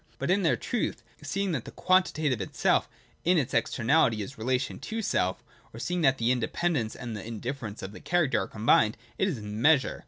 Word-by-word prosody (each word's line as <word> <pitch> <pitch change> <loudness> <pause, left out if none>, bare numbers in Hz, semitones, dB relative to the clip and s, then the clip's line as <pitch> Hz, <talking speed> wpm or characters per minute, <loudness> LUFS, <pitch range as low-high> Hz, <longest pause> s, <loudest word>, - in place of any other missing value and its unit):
But 140 +7 -1
in 200 +2 +3
their 155 -9 +2
truth, 215 - -2 0.2
seeing 190 +7 -1
that 135 -8 -2
the - - -7
quantitative 155 - +1
itself 95 - +1 0.3
in 180 +1 +4
its 140 -6 0
externality 120 -3 +2
is 135 - -9
relation 130 +2 -1
to 225 0 -4
self, 95 - 0 0.3
or - - -8
seeing 175 +7 -1
that 135 -3 +4
the 115 0 +2
independence 125 +1 0
and 120 -3 -6
the 105 - -6
indifference 115 -1 -5
of 95 - -5
the - - -10
character 165 -5 +1
are - - -4
combined, 110 0 +3 0.2
it 190 - +3
is 155 - -2
Measure. 120 +8 +2
130 Hz, 190 wpm, -28 LUFS, 115-165 Hz, 0.3 s, in